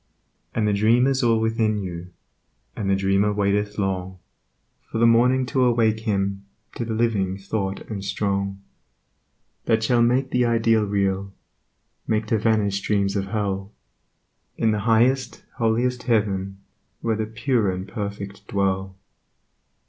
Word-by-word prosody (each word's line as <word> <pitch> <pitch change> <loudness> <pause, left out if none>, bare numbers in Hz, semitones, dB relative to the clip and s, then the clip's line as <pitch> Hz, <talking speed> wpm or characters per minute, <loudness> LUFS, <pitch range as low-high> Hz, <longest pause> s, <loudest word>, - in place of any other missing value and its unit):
And 110 -2 +1
the 105 - +2
Dream 115 +5 +4
is 135 0 +1
all 115 -2 +3
within 110 -1 +1
you, 90 -3 -6 0.7
And 100 -2 -2
the 100 - +4
Dreamer 95 +2 +2
waiteth 105 +1 0
long 95 -2 -2 0.7
For - - -4
the 115 - +4
Morning 125 +3 +4
to 130 +1 +1
awake 115 -3 +2
him 100 -3 -1 0.3
To - - -4
the 115 -1 -3
living 105 -5 0
thought 100 0 -3
and 100 -3 -6
strong. 100 -1 -2 1.1
That 110 0 +2
shall 120 +1 +3
make 125 +3 +2
the 125 - +2
ideal 115 -2 +2
real, 100 -1 -1 0.7
Make 110 0 0
to 110 - +3
vanish 105 -3 +1
dreams 100 -1 0
of 100 -1 0
hell 100 -1 -3 0.8
In 110 - +2
the 105 - 0
highest, 120 +1 +2
holiest 120 +1 +1
heaven 100 -5 0 0.4
Where 115 -1 0
the 110 0 -2
pure 115 -1 0
and 95 +1 -4
perfect 100 -2 -6
dwell. 95 -3 -1
105 Hz, 140 wpm, -23 LUFS, 100-115 Hz, 1.1 s, Dream